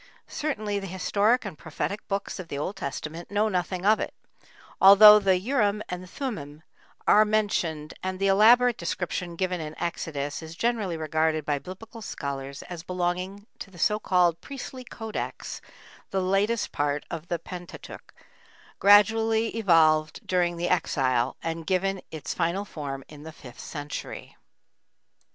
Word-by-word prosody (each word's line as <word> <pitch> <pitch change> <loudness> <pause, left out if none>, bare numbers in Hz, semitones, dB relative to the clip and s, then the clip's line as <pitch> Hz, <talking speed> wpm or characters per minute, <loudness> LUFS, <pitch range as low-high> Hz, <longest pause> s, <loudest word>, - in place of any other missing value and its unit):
Certainly, 215 -9 -2
the 195 - -6
historic 205 +6 +1
and 195 -5 -5
prophetic 160 +7 -5
books 200 0 -3
of 180 - -7
the 140 - -5
Old 165 +8 -3
Testament 155 +1 -6
know 210 +2 +1
nothing 180 -1 -2
of 215 +1 +5
it, - - -4 0.7
although 210 +2 +10
the 190 -2 +3
Urim 210 -1 0
and 180 0 -6
Thummim 160 - -6 0.4
are 210 - +6
mentioned 190 -8 -1
and 185 0 -3
the 195 - -1
elaborate 230 +5 +5
description 175 0 -3
given 180 -1 -1
in 155 0 -7
Exodus 150 -4 -3
is 160 0 -9
generally 215 -5 -1
regarded 155 0 0
by 145 -1 0
Biblical 220 - -10
scholars 140 -7 -5
as 175 -2 -7
belonging 180 +3 -3
to - - -7
the 185 - -16
so 210 +5 +2
called 175 -4 +2
"Priestly 265 -2 -8
Codex," 225 -2 -6 0.5
the 195 - -1
latest 195 +4 +1
part 145 0 -1
of 165 0 -6
the 170 - -1
Pentateuch, 180 0 -10 0.7
gradually 220 +2 +5
evolved 160 -7 +3
during 175 -2 +1
the 175 +1 -1
Exile 130 -8 +1
and 165 0 -4
given 195 0 0
its 155 -3 -5
final 180 +4 -1
form 140 -7 -6
in 150 -1 -12
the 160 +1 -9
fifth 125 -6 -13
century 145 -2 -7
B. - - -34
180 Hz, 150 wpm, -26 LUFS, 160-205 Hz, 0.7 s, although